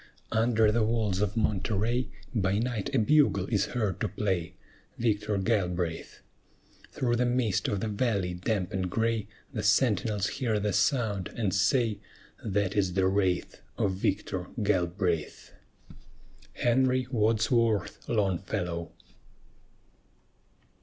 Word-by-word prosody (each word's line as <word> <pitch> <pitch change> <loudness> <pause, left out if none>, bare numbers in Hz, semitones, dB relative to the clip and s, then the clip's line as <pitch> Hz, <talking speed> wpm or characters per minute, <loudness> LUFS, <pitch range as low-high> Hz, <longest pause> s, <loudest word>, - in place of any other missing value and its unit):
Under 110 -1 +3
the 115 0 +2
walls 110 -4 0
of 105 +2 -1
Monterey 110 +3 0 0.2
By 100 -3 +1
night 115 -2 -2
a 135 - +1
bugle 115 -5 +3
is 100 -1 +3
heard 105 -5 -1
to 110 - +1
play, 95 -5 -2 0.4
Victor 105 -2 0
Galbraith! 90 -5 -1 0.7
Through 120 -2 0
the 125 - +2
mist 120 -5 +1
of 100 -2 -1
the 110 - -1
valley 100 -4 0
damp 95 +1 -2
and 95 -1 -1
gray 115 +1 0 0.3
The - - -2
sentinels 105 -3 +2
hear 115 -5 -1
the 105 -1 -1
sound, 110 - +1
and 105 -6 -1
say, 105 +2 +2 0.4
"That 100 -2 0
is 95 -3 +1
the 95 -1 +3
wraith 95 -2 0 0.2
Of 100 - +1
Victor 95 -1 -2 0.2
Galbraith!" 90 -4 -1 1.0
HENRY 130 +1 +2
WADSWORTH 115 -2 +1
LONGFELLOW. 90 -5 -1
105 Hz, 120 wpm, -28 LUFS, 95-115 Hz, 1.0 s, Under